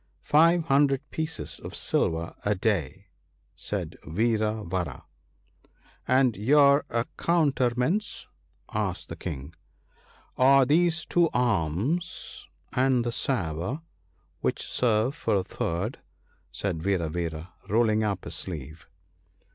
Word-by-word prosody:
1 - - -40
Five 165 +3 +4
hundred 140 -2 +2
pieces 160 0 -4
of - - -8
silver 85 0 0
a 105 +1 +1
day,' 95 - -1 0.5
said - - -5
Vira 110 +3 0
vara. 85 -6 -4 0.5
' - - -33
And 130 -4 +3
your 140 +7 +5
accoutrements? 135 - 0 0.2
' - - -40
asked 105 -4 -2
the - - -5
King. 70 +2 -6 0.8
1 130 - +5
Are 135 -1 +7
these 160 +3 +2
two 170 -2 +3
arms, 120 - -1 0.2
and 130 -1 +2
this 120 0 -2
sabre, 110 - -2 0.6
which - - -1
serve 115 +1 +1
for 155 - 0
a 95 - +1
third/ 90 +6 -3 0.5
said 90 -6 -3
Vira 90 -2 0
vara, 80 +1 -4 0.2
rolling 110 0 +3
up 100 -4 -1
his - - -6
sleeve. 80 -1 -6
110 Hz, 120 wpm, -27 LUFS, 90-140 Hz, 0.8 s, Are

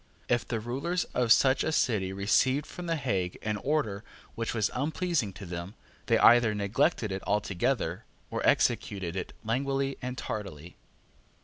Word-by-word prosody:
If 120 -1 +1
the 115 - -2
rulers 140 +11 -2
of 120 -2 +1
such 130 +2 +5
a 160 - 0
city 105 -10 +1
received 130 +9 +2
from 180 -1 -8
the 165 - +1
Hague 100 - -1
an 105 -1 -1
order 110 -6 -1 0.3
which 115 0 -3
was 110 -2 +1
unpleasing 150 - -1
to 95 - -9
them, 85 +3 -6 0.3
they - - +4
either 115 -2 +6
neglected 110 - +1
it 95 0 -3
altogether, 100 -3 0 0.3
or - - -2
executed 95 -4 +1
it 95 - -4
languidly 135 +4 -1
and 125 0 -4
tardily. 90 -6 -6
115 Hz, 150 wpm, -29 LUFS, 100-135 Hz, 0.3 s, either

